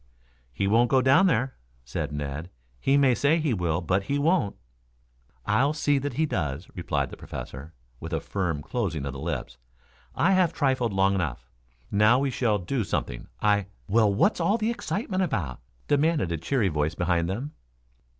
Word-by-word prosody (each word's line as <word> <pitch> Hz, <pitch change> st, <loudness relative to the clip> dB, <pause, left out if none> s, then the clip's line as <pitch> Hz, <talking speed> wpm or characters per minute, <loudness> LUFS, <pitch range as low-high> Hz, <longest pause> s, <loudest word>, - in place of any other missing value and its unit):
"He 60 Hz, +11 st, -2 dB
won't 115 Hz, +4 st, +4 dB
go 135 Hz, -, +4 dB
down 140 Hz, +10 st, +5 dB
there," 130 Hz, -5 st, +1 dB, 0.3 s
said -, -, -3 dB
Ned. 75 Hz, +3 st, -4 dB, 0.3 s
"He 135 Hz, -, +3 dB
may 135 Hz, -3 st, +5 dB
say 140 Hz, +7 st, +3 dB
he 155 Hz, -5 st, 0 dB
will, 85 Hz, -3 st, 0 dB
but 95 Hz, +3 st, 0 dB
he 140 Hz, +6 st, 0 dB
won't." 155 Hz, -, +1 dB, 0.9 s
"I'll 130 Hz, +8 st, +2 dB
see 145 Hz, -2 st, +1 dB
that 140 Hz, 0 st, -3 dB
he 160 Hz, +5 st, +1 dB
does," 80 Hz, -, -3 dB
replied 70 Hz, -6 st, -2 dB
the -, -, -9 dB
Professor, 75 Hz, +5 st, -8 dB, 0.2 s
with 80 Hz, -, -7 dB
a 80 Hz, -, 0 dB
firm 85 Hz, -4 st, -2 dB
closing 85 Hz, -, -2 dB
of 70 Hz, -, -4 dB
the 70 Hz, -, -7 dB
lips. 70 Hz, -6 st, -4 dB, 0.6 s
"I 175 Hz, -, +3 dB
have 185 Hz, -3 st, +3 dB
trifled 130 Hz, -5 st, +1 dB
long 95 Hz, 0 st, +3 dB
enough. 75 Hz, -10 st, -3 dB, 0.4 s
Now 105 Hz, +4 st, +5 dB
we 135 Hz, 0 st, 0 dB
shall 115 Hz, -4 st, +1 dB
do 110 Hz, +6 st, -2 dB
something. -, -, -3 dB, 0.2 s
I 105 Hz, -2 st, +3 dB
" -, -, -35 dB
"Well, 110 Hz, 0 st, +4 dB
what's 200 Hz, -, +2 dB
all 205 Hz, +3 st, +2 dB
the 220 Hz, +1 st, 0 dB
excitement 200 Hz, -4 st, -2 dB
about?" 95 Hz, -, -2 dB, 0.3 s
demanded 145 Hz, -, +2 dB
a 85 Hz, -, -1 dB
cheery 100 Hz, -, 0 dB
voice 75 Hz, +1 st, -1 dB
behind 85 Hz, -1 st, 0 dB
them. 125 Hz, +10 st, -3 dB
105 Hz, 180 wpm, -26 LUFS, -, 0.9 s, down